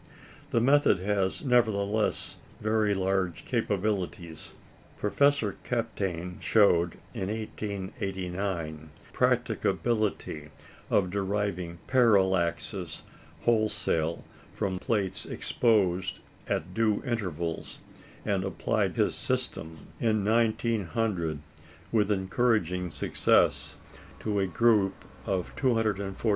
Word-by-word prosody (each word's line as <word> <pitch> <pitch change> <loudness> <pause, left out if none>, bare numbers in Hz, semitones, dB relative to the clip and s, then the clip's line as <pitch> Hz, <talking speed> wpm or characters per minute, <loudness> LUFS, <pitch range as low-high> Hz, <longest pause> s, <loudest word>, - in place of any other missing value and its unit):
The 115 - +2
method 135 -3 +4
has, 100 +5 0
nevertheless, 110 -4 +1 0.2
very 110 -1 +2
large 95 -2 0
capabilities. 95 -7 -2 0.4
Professor 140 -1 +2
Kapteyn 95 -7 -3
showed, 90 -6 +4 0.2
in 95 - -3
1889, 95 -6 -4 0.2
the - - -21
practicability 105 -9 0 0.4
of 90 -3 +2
deriving 95 -3 -2
parallaxes 95 - +2 0.4
wholesale 105 -8 +1 0.3
from 95 -3 -1
plates 100 -2 -1
exposed 95 -6 +1 0.3
at 90 +4 -2
due 110 -1 +1
intervals, 90 - -3 0.5
and 100 -3 +1
applied 95 - 0
his - - +2
system, 80 -1 -3
in 110 -3 +1
1900, 110 -6 +1 0.5
with 105 -3 +2
encouraging 95 -3 +1
success, - - +2 0.4
to 105 -2 -1
a 95 - +1
group 100 +1 +2 0.2
of 95 -2 -2
248 110 -6 +1
stars. 115 - -4
100 Hz, 90 wpm, -28 LUFS, 90-110 Hz, 0.5 s, method